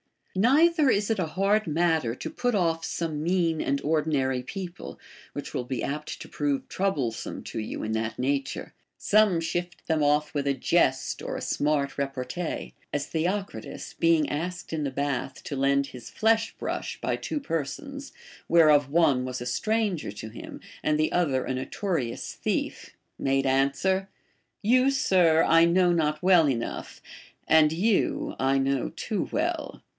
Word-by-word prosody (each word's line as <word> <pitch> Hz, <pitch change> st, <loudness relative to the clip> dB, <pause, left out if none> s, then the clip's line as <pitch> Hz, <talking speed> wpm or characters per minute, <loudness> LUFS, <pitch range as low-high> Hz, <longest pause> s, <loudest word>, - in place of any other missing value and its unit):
Neither 290 Hz, -, +4 dB
is 205 Hz, -1 st, +2 dB
it 220 Hz, -, 0 dB
a 175 Hz, -, 0 dB
hard 195 Hz, +5 st, +1 dB
matter 160 Hz, -6 st, +1 dB
to -, -, -5 dB
put 245 Hz, -2 st, -1 dB
oif 165 Hz, -4 st, +1 dB
some 160 Hz, -3 st, -3 dB
mean 170 Hz, -1 st, +1 dB
and 140 Hz, 0 st, 0 dB
ordinary 145 Hz, -4 st, +1 dB
people, 180 Hz, +6 st, -7 dB, 0.4 s
which -, -, -6 dB
will 125 Hz, -, -2 dB
be 125 Hz, -1 st, -3 dB
apt 150 Hz, +2 st, -4 dB
to -, -, -9 dB
prove 145 Hz, -2 st, -1 dB
trouble 185 Hz, -12 st, 0 dB
some 110 Hz, -, -7 dB
to -, -, -5 dB
you 110 Hz, -, -4 dB
in 110 Hz, -, -2 dB
that 110 Hz, 0 st, -2 dB
nature. 135 Hz, +1 st, -2 dB, 0.2 s
Some 205 Hz, -5 st, +3 dB
shift 175 Hz, +2 st, -4 dB
them 160 Hz, -2 st, +1 dB
off 150 Hz, +1 st, +2 dB
with 140 Hz, -1 st, -1 dB
a 140 Hz, -, +3 dB
jest 130 Hz, -4 st, +1 dB
or -, -, -4 dB
a -, -, -4 dB
smart 145 Hz, -1 st, 0 dB
repartee; 140 Hz, +4 st, -4 dB, 0.2 s
as 145 Hz, -1 st, -1 dB
Theocritus, 175 Hz, -, -3 dB
being 165 Hz, -3 st, +4 dB
asked 175 Hz, +5 st, -4 dB
in 155 Hz, -2 st, -2 dB
the -, -, 0 dB
bath 135 Hz, -1 st, -3 dB
to 140 Hz, -, -5 dB
lend 140 Hz, +1 st, +2 dB
his 125 Hz, -4 st, -10 dB
flesh 225 Hz, +1 st, +1 dB
brush -, -, -4 dB
by -, -, 0 dB
two 300 Hz, -, -3 dB
persons, 275 Hz, -, -4 dB, 0.3 s
whereof 150 Hz, -4 st, +5 dB
one 140 Hz, -5 st, +3 dB
was 125 Hz, -1 st, -4 dB
a -, -, -4 dB
stranger 200 Hz, -, -1 dB
to 110 Hz, +1 st, -7 dB
him, -, -, -9 dB, 0.2 s
and 150 Hz, 0 st, +1 dB
the 155 Hz, 0 st, +1 dB
other 140 Hz, -8 st, +1 dB
a -, -, -2 dB
notorious 130 Hz, -, -3 dB
thief, -, -, -3 dB, 0.2 s
made 135 Hz, 0 st, +1 dB
answer: 140 Hz, +9 st, +1 dB, 0.5 s
You, 255 Hz, +5 st, +4 dB
sir, 180 Hz, -11 st, +4 dB
I 165 Hz, 0 st, +6 dB
know 175 Hz, +1 st, +4 dB
not 155 Hz, -2 st, 0 dB
well 180 Hz, -5 st, +6 dB
enough, 120 Hz, -3 st, -4 dB, 0.5 s
and 155 Hz, -1 st, +6 dB
you 200 Hz, +5 st, +1 dB
I 135 Hz, +1 st, +2 dB
know 135 Hz, -1 st, 0 dB
too -, -, -2 dB
Avell. -, -, -2 dB
155 Hz, 160 wpm, -27 LUFS, 135-180 Hz, 0.5 s, I